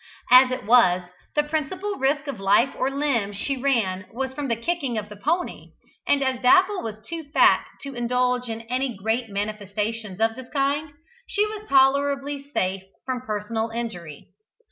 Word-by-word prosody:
As 255 Hz, +1 st, +9 dB
it 255 Hz, -2 st, -4 dB
was, 200 Hz, -6 st, +5 dB, 0.3 s
the 295 Hz, -, +3 dB
principal 320 Hz, +7 st, -2 dB
risk 275 Hz, +2 st, +1 dB
of 275 Hz, -8 st, -5 dB
life 205 Hz, +7 st, +3 dB
or 260 Hz, -, 0 dB
limb 275 Hz, -8 st, 0 dB
she 275 Hz, +8 st, -1 dB
ran 225 Hz, -8 st, 0 dB
was 265 Hz, +2 st, -3 dB
from 290 Hz, 0 st, -4 dB
the 230 Hz, -, +1 dB
kicking 270 Hz, -1 st, -2 dB
of 210 Hz, -1 st, -4 dB
the 210 Hz, -, -9 dB
pony 325 Hz, -, -2 dB, 0.3 s
and 280 Hz, -1 st, +3 dB
as 260 Hz, -2 st, -1 dB
Dapple 370 Hz, +9 st, +4 dB
was 220 Hz, -1 st, -5 dB
too 330 Hz, -2 st, -5 dB
fat -, -, +5 dB, 0.2 s
to 275 Hz, -1 st, -6 dB
indulge 250 Hz, 0 st, 0 dB
in 225 Hz, 0 st, -4 dB
any 250 Hz, +2 st, -2 dB
great 225 Hz, +4 st, -1 dB
manifestations 210 Hz, 0 st, -3 dB
of 225 Hz, 0 st, +2 dB
this 260 Hz, -1 st, -10 dB
kind, 285 Hz, +2 st, 0 dB, 0.4 s
she 415 Hz, 0 st, +1 dB
was 425 Hz, 0 st, -7 dB
tolerably 280 Hz, +1 st, +2 dB
safe 190 Hz, -8 st, -1 dB, 0.2 s
from 255 Hz, -2 st, -2 dB
personal 220 Hz, 0 st, -3 dB
injury. 200 Hz, -10 st, -6 dB
250 Hz, 165 wpm, -24 LUFS, 220-280 Hz, 0.4 s, As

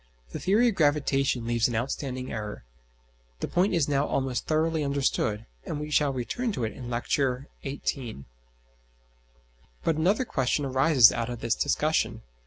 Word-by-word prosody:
The -, -, -5 dB
theory 220 Hz, +6 st, +3 dB
of -, -, -2 dB
gravitation 140 Hz, -6 st, +1 dB
leaves 120 Hz, -1 st, +2 dB
an 120 Hz, -, -3 dB
outstanding 130 Hz, +1 st, -3 dB
error. 105 Hz, -, -5 dB, 0.7 s
(The -, -, -2 dB
point 180 Hz, +2 st, +2 dB
is 160 Hz, -5 st, +2 dB
now 145 Hz, 0 st, +1 dB
almost 130 Hz, -2 st, -1 dB
thoroughly 160 Hz, 0 st, +1 dB
understood, 135 Hz, -6 st, 0 dB, 0.2 s
and 150 Hz, -, -4 dB
we 150 Hz, 0 st, -5 dB
shall 145 Hz, -1 st, +3 dB
return 135 Hz, -, -2 dB
to 125 Hz, -, -3 dB
it 110 Hz, -, -2 dB
in 125 Hz, -2 st, -8 dB
Lecture 125 Hz, +2 st, -1 dB
XVIII). 135 Hz, -, -4 dB, 1.6 s
But 160 Hz, -, +1 dB
another 195 Hz, +10 st, +2 dB
question 135 Hz, -, 0 dB
arises 130 Hz, -2 st, +6 dB
out 115 Hz, 0 st, -2 dB
of 120 Hz, -2 st, -6 dB
this 115 Hz, -1 st, +1 dB
discussion. 155 Hz, +3 st, 0 dB
135 Hz, 155 wpm, -27 LUFS, 120-155 Hz, 1.6 s, arises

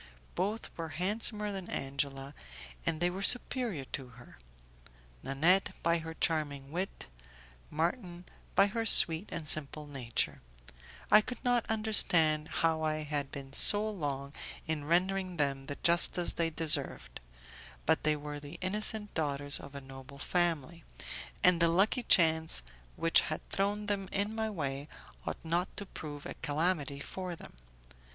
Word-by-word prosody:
Both 205 Hz, +5 st, -3 dB
were 165 Hz, -1 st, -4 dB
handsomer 210 Hz, +3 st, +2 dB
than 190 Hz, -2 st, -6 dB
Angela, 135 Hz, 0 st, -3 dB, 0.5 s
and 160 Hz, -, 0 dB
they 175 Hz, +1 st, +2 dB
were 190 Hz, +2 st, -5 dB
superior 235 Hz, -, +1 dB
to 135 Hz, -3 st, -4 dB
her 120 Hz, -, -15 dB, 0.8 s
Nanette 165 Hz, +8 st, +2 dB
by 170 Hz, 0 st, +2 dB
her 160 Hz, 0 st, -7 dB
charming 145 Hz, -5 st, -1 dB
wit, 185 Hz, +4 st, -4 dB, 0.6 s
Marton 175 Hz, +2 st, -3 dB, 0.3 s
by 195 Hz, -, +6 dB
her 225 Hz, +3 st, -2 dB
sweet 170 Hz, -4 st, +4 dB
and 165 Hz, -3 st, -4 dB
simple 150 Hz, 0 st, +2 dB
nature; 130 Hz, -5 st, -2 dB, 0.7 s
I 210 Hz, -, +9 dB
could 245 Hz, +3 st, -6 dB
not 245 Hz, -1 st, +1 dB
understand 175 Hz, -8 st, +3 dB
how 165 Hz, -1 st, 0 dB
I 155 Hz, 0 st, -1 dB
had 145 Hz, -2 st, -3 dB
been 135 Hz, -1 st, -8 dB
so 205 Hz, +8 st, +4 dB
long 140 Hz, -8 st, -4 dB, 0.3 s
in 155 Hz, -2 st, -3 dB
rendering 185 Hz, +2 st, 0 dB
them 135 Hz, -2 st, -1 dB
the 145 Hz, -, -4 dB
justice 175 Hz, +1 st, +4 dB
they 165 Hz, -1 st, 0 dB
deserved, 150 Hz, -, +1 dB, 0.7 s
but -, -, +2 dB
they 155 Hz, 0 st, +2 dB
were 145 Hz, 0 st, -6 dB
the 145 Hz, +3 st, -10 dB
innocent 210 Hz, +2 st, 0 dB
daughters 145 Hz, -2 st, +3 dB
of 140 Hz, 0 st, -11 dB
a 140 Hz, -, -6 dB
noble 135 Hz, +1 st, -12 dB
family, 170 Hz, 0 st, -1 dB, 0.6 s
and 180 Hz, -1 st, +5 dB
the 170 Hz, -, +6 dB
lucky 195 Hz, +9 st, +2 dB
chance 160 Hz, -, +4 dB, 0.3 s
which 165 Hz, 0 st, +4 dB
had 155 Hz, -, -5 dB
thrown 205 Hz, +2 st, -1 dB
them 200 Hz, -2 st, -2 dB
in 205 Hz, +2 st, -1 dB
my 220 Hz, 0 st, -2 dB
way 140 Hz, -7 st, -4 dB, 0.4 s
ought -, -, -2 dB
not 175 Hz, +3 st, -1 dB
to 205 Hz, -, -4 dB
prove 150 Hz, -5 st, -8 dB
a -, -, -5 dB
calamity 150 Hz, -2 st, -1 dB
for 180 Hz, +3 st, -5 dB
them. -, -, -12 dB
165 Hz, 145 wpm, -31 LUFS, 145-195 Hz, 0.8 s, I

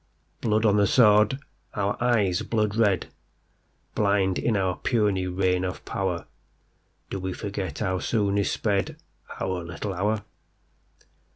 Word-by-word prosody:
Blood 110 Hz, 0 st, +1 dB
on 105 Hz, -1 st, +4 dB
the 100 Hz, -1 st, +4 dB
sword, 105 Hz, +1 st, +5 dB, 0.4 s
our 100 Hz, 0 st, 0 dB
eyes 105 Hz, -7 st, +2 dB
blood 105 Hz, -2 st, 0 dB
red, 105 Hz, -5 st, +2 dB, 0.8 s
Blind 100 Hz, -2 st, +2 dB
in 110 Hz, -3 st, +1 dB
our 95 Hz, -2 st, 0 dB
puny 105 Hz, -6 st, +1 dB
reign 90 Hz, 0 st, +1 dB
of 90 Hz, -1 st, -4 dB
power, 90 Hz, -3 st, -2 dB, 0.9 s
Do 95 Hz, -, -3 dB
we 95 Hz, 0 st, -3 dB
forget 100 Hz, -2 st, -4 dB
how 95 Hz, -4 st, -1 dB
soon 100 Hz, -2 st, +1 dB
is 100 Hz, -, +1 dB
spedOur 100 Hz, -3 st, 0 dB, 0.7 s
little 85 Hz, +4 st, -5 dB
hour? 105 Hz, +3 st, 0 dB
100 Hz, 125 wpm, -26 LUFS, 95-105 Hz, 0.9 s, sword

